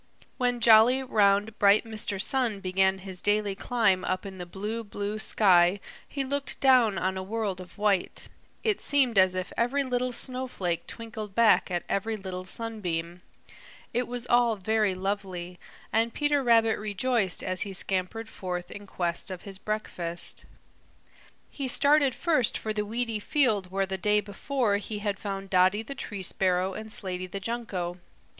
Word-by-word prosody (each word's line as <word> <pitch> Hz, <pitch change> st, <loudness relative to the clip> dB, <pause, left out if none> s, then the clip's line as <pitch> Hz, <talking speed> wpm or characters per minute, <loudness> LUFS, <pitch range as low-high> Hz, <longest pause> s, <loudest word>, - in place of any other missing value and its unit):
When 245 Hz, -1 st, +1 dB
jolly, 230 Hz, +4 st, +6 dB
round, 210 Hz, -3 st, +2 dB
bright 200 Hz, +2 st, +5 dB
Mr. 215 Hz, -3 st, -3 dB
Sun 235 Hz, -2 st, 0 dB
began 190 Hz, 0 st, +2 dB
his 185 Hz, -2 st, -6 dB
daily 205 Hz, -1 st, +2 dB
climb 200 Hz, -3 st, +1 dB
up 185 Hz, +1 st, -2 dB
in 190 Hz, -1 st, -8 dB
the 175 Hz, -, -6 dB
blue, 210 Hz, +5 st, -4 dB
blue 205 Hz, 0 st, -4 dB
sky 185 Hz, -3 st, +4 dB, 0.3 s
he 275 Hz, -, -3 dB
looked 280 Hz, +1 st, -3 dB
down 250 Hz, -7 st, +4 dB
on 190 Hz, 0 st, -1 dB
a -, -, -3 dB
world 200 Hz, -1 st, -3 dB
of 180 Hz, +2 st, -10 dB
white. 205 Hz, -3 st, 0 dB, 0.4 s
It 430 Hz, -3 st, +1 dB
seemed 260 Hz, -7 st, +3 dB
as 185 Hz, -1 st, +4 dB
if 185 Hz, 0 st, -4 dB
every 260 Hz, +4 st, +1 dB
little 250 Hz, -1 st, -1 dB
snowflake 250 Hz, -9 st, -2 dB
twinkled 215 Hz, -3 st, -6 dB
back 230 Hz, -3 st, +4 dB
at 175 Hz, -1 st, -2 dB
every 220 Hz, +3 st, -1 dB
little 185 Hz, -2 st, -6 dB
sunbeam. 180 Hz, -6 st, -3 dB, 0.7 s
It 245 Hz, 0 st, 0 dB
was 245 Hz, -1 st, -4 dB
all 240 Hz, -2 st, +3 dB
very 210 Hz, 0 st, +1 dB
lovely, 185 Hz, -2 st, -4 dB, 0.3 s
and 225 Hz, +1 st, +2 dB
Peter 290 Hz, -1 st, +2 dB
Rabbit 225 Hz, -2 st, +4 dB
rejoiced 210 Hz, -1 st, 0 dB
as 185 Hz, -1 st, -2 dB
he 200 Hz, -, -2 dB
scampered 195 Hz, +4 st, -1 dB
forth 180 Hz, -4 st, -5 dB
in 200 Hz, 0 st, -9 dB
quest 175 Hz, -1 st, -2 dB
of 185 Hz, -2 st, -7 dB
his 195 Hz, -2 st, -8 dB
breakfast. 175 Hz, -6 st, -3 dB, 1.1 s
He 275 Hz, -2 st, -4 dB
started 280 Hz, 0 st, +3 dB
first 305 Hz, -9 st, +1 dB
for 215 Hz, -, -3 dB
the 210 Hz, -1 st, -2 dB
weedy 230 Hz, 0 st, -1 dB
field 215 Hz, -, +1 dB
where 195 Hz, +1 st, 0 dB
the 190 Hz, 0 st, -4 dB
day 210 Hz, +3 st, +3 dB
before 210 Hz, +2 st, -1 dB
he 210 Hz, +1 st, -5 dB
had 205 Hz, -1 st, -2 dB
found 195 Hz, -1 st, -5 dB
Dotty 185 Hz, +3 st, +4 dB
the 275 Hz, -, -6 dB
Tree 205 Hz, -7 st, -6 dB
Sparrow 185 Hz, +1 st, +1 dB
and 220 Hz, +2 st, -7 dB
Slaty 185 Hz, -2 st, -2 dB
the 195 Hz, +2 st, -5 dB
Junco. 190 Hz, -5 st, -4 dB
205 Hz, 165 wpm, -27 LUFS, 190-230 Hz, 1.1 s, jolly